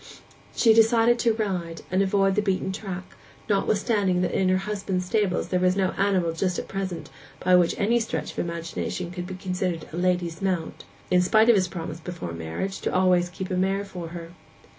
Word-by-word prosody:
She 225 -2 +5
decided 230 +1 +4
to 235 -1 +3
ride, 180 -7 -3
and 185 +1 +2
avoid 195 0 +2
the 210 - +2
beaten 190 -2 -1
track, 190 -2 -5 0.4
notwithstanding 200 -2 +1
that - - 0
in 190 -1 +1
her 185 - +3
husband's 195 -2 -2
stables 205 -2 0
there 180 - +1
was 185 0 +3
no 190 -1 +1
animal 190 -4 +1
just 180 +2 -1
at - - -4
present 185 -6 -4 0.3
which 180 -2 +4
by 210 - -1
any 235 +4 +3
stretch 160 -9 -3
of - - -7
imagination 170 +1 -4
could 180 0 -5
be 185 - -6
considered 180 -3 -3
a - - -4
lady's 175 -2 0
mount, 185 -4 -2 0.3
in 180 0 +5
spite 220 +5 +4
of 235 - +7
his 185 -2 +2
promise 165 -2 -6
before 165 - -6
marriage 85 - -4
to - - -1
always 180 -1 +3
keep 185 +1 -6
a - - 0
mare 195 +2 0
for 180 -4 -7
her. 170 0 -8
185 Hz, 195 wpm, -25 LUFS, 175-200 Hz, 0.4 s, of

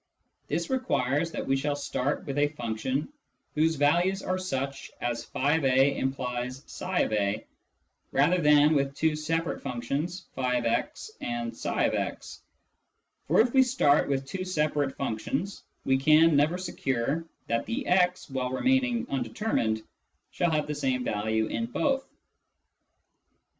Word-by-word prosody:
This - - -2
requires 165 - +1
that - - -3
we 135 - +2
shall 145 +2 -1
start 145 -1 -2
with 140 0 -2
a 145 - +4
function 130 0 -3 0.5
whose 160 +1 +2
values 175 +7 +2
are 185 0 -1
such 135 -6 -3
as 120 -1 -2
" - - -26
<f>a 135 -1 +3
implies 125 -1 -3
tpa," 110 - -1 0.7
rather 165 +6 +3
than 150 0 +6
with 140 -1 0
two 160 0 +1
separate 165 +2 -2
functions 140 +9 -3
(fix 125 - -1
and 240 -3 -3
tfix; - - -2 0.9
for - - +5
if 235 +1 +1
we 265 - +7
start 245 - +3
with 135 -1 0
two 185 +7 -4
separate 150 -6 0
functions 140 - -3 0.2
we 135 0 +3
can 155 +3 +5
never 150 +5 +3
secure 145 -4 -2 0.2
that 115 0 -1
the 255 +4 -2
x, 180 0 +2
while 130 -2 -2
remaining 245 - +1
undetermined, 115 - -1 0.5
shall 175 - +1
have 155 -2 +1
the 150 - -3
same 130 -3 -1
value 110 +1 0
in 230 - -2
both. 270 +2 0
145 Hz, 130 wpm, -28 LUFS, 130-180 Hz, 0.9 s, we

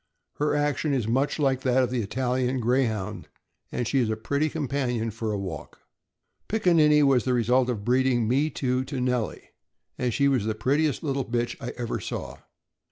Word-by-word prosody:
Her 150 +1 +1
action 145 0 0
is 120 -5 -1
much 135 +5 +1
like 135 -3 +1
that 130 0 +3
of 125 - -1
the 125 -2 0
Italian 125 +3 -1
Greyhound, 120 -4 -1 0.4
and 120 - -2
she 135 - +1
is 120 -4 +1
a 110 - 0
pretty 140 +8 -1
companion 130 -6 -2
for 110 0 -3
a 105 - -1
walk. 95 -6 -6 0.7
Pickaninny 165 -8 +4
(6077) - - +5
was 130 -3 +3
the 130 - +1
result 125 +2 +2
of 105 -5 -3
breeding 125 -2 +2
Me 140 +6 +2
Too 130 -3 -1
to 135 -1 -4
Nellie, 125 -3 -2 0.5
and 125 -1 0
she 140 +4 +2
was 130 -6 +1
the 110 -1 -1
prettiest 140 +5 0
little 135 -3 -1
bitch 120 0 -2
I 120 - -4
ever 120 -2 -3
saw. - - -5
125 Hz, 185 wpm, -26 LUFS, 120-140 Hz, 0.7 s, 6077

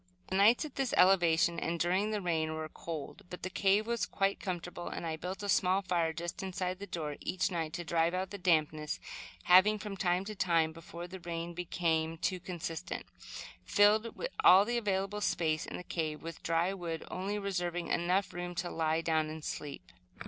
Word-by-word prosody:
The - - -1
nights, 215 +9 +5
at 300 - -10
this 270 -3 0
elevation, 170 -2 +5
and 170 0 -2
during 185 +5 +2
the 210 -1 -1
rain, 160 -2 0
were 155 0 -4
cold, 160 +3 -7
but 180 - -8
the 185 - -3
cave 200 +3 +3
was 235 0 -1
quite 195 0 0
comfortable, 175 -1 -5
and - - -5
I 160 -1 -2
built 185 +5 -5
a - - -2
small 190 0 +3
fire 170 -3 +1
just 170 +3 -5
inside 185 -1 -3
the 200 - -7
door 155 -5 -4
each 185 +2 -1
night, 165 -3 -2
to 175 - -3
drive 165 +1 +1
out 190 +1 -2
the 200 - -6
dampness; 155 -4 +1 0.4
having, 190 +4 +6
from 210 -1 -6
time 180 0 +1
to 215 - -5
time 170 -5 +2
before 165 +1 -8
the 185 +1 -8
rain 170 0 -4
became 165 -2 -1
too 180 +2 -1
constant, 170 -3 -5 0.6
filled 210 - +3 0.2
all 190 +2 +8
the 240 +1 0
available 200 -1 -1
space 160 -4 0
in - - -5
the - - -7
cave 155 -3 -3
with 165 0 -7
dry 165 +3 +1
wood, 170 -4 -5
only 195 +3 -2
reserving 175 -4 -2
enough 180 +3 +1
room 175 0 -5
to 175 +1 -2
lie 160 0 +1
down 160 -2 +1
to 155 +1 -6
sleep. 150 -2 -6
175 Hz, 190 wpm, -32 LUFS, 165-195 Hz, 0.6 s, all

